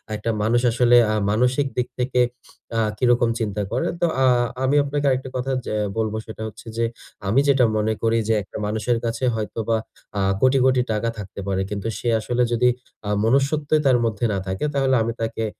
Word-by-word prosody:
একটা 105 +2 -3
মানুষ 120 +3 +2
আসলে 120 +1 +5
আ - - +1 0.2
মানসিক 125 +5 +2
দিক 125 - 0
থেকে 125 0 +1 0.6
আ - - +2 0.2
কিরকম 120 -2 +3
চিন্তা 105 -2 -2
করে।" 125 - 0
তো - - +4 0.2
আ - - +5 0.4
আমি 135 +2 +2
আপনাকে 145 +1 -2
আরেকটা 130 0 -1
কথা 130 +2 -2 0.2
যা - - -2 0.2
বলবো, 110 -1 -1
সেটা 110 0 -9
হচ্ছে 110 - -12
যে, 115 - +2 0.4
আমি 110 +7 +3
যেটা 135 -3 +5
মনে 110 +1 +1
করি 115 0 +2
যে, 115 - +3
একটা - - -9
মানুষের 110 +3 0
কাছে 115 +2 -3
হয়তোবা 110 +1 -1 0.4
আ - - +1 0.2
কোটি, 130 +1 +4
কোটি 130 -1 +4
টাকা 110 +2 0
থাকতে 100 -2 -8
পারে। 95 -1 0
কিন্তু 100 +1 -4
সে - - -4
আসলে 120 +3 0
যদি 120 +1 +3 0.4
আ - - -1 0.2
মনুষ্যত্বই 140 +5 +2
তার 130 -2 +5
মধ্যে 110 0 -1
না - - -1
থাকে, 95 +8 -2
তাহলে 135 -1 +2
আমি 115 +1 -2
তাকে 115 0 -2
120 Hz, 190 wpm, -22 LUFS, 110-130 Hz, 0.6 s, আসলে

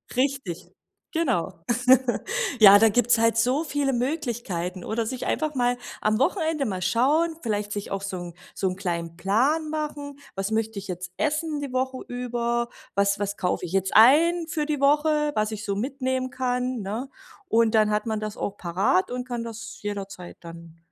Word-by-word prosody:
Richtig. 255 -10 -1 0.4
Genau. 190 - -1 1.0
Ja, 205 -1 +10
da 225 - +6
gibt's 240 +2 +3
halt 230 0 +3
so 255 +7 +2
viele 285 -2 0
Möglichkeiten. 235 - -3
Oder 225 +1 -1
sich 255 +2 -4
einfach 305 -2 -1
mal 245 0 +1 0.2
am 215 +2 +1
Wochenende 320 -2 +1
mal 190 -4 -3
schauen, 285 - +2
vielleicht 210 -2 -2
sich 205 -1 -5
auch 195 0 -2
so 195 -1 -4
'n 175 -1 -7 0.2
so 190 - 0
'n 185 - -4
kleinen 170 -3 -3
Plan 265 - +1
machen. 290 -2 -4 0.2
„Was 195 +2 -2
möchte 220 -2 -1
ich 195 - -9
jetzt 180 -1 -6
essen 305 0 -1
die 275 -3 -5
Woche 260 0 -1
über? 240 -1 -2 0.3
Was 200 0 +2
was 205 0 -2
kaufe 180 -1 -1
ich 175 - -8
jetzt 190 -1 +1
ein 320 +9 +6
für 315 -2 -1
die 295 -2 -2
Woche, 300 +1 +3
was 215 0 0
ich 215 +1 -5
so 200 - -1
mitnehmen 260 +2 -2
kann“, 250 0 -1
ne? 220 +8 -4 0.4
Und 230 0 +3
dann, 215 -1 +4
hat 210 +1 0
man 220 -1 -2
das 215 -1 -5
auch 205 - -3
parat 185 +2 +1
und 250 0 -4
kann 240 -2 -3
das 230 -1 -8
jederzeit 200 -3 -6
dann, 165 -1 -12
230 Hz, 180 wpm, -25 LUFS, 200-275 Hz, 1.0 s, Ja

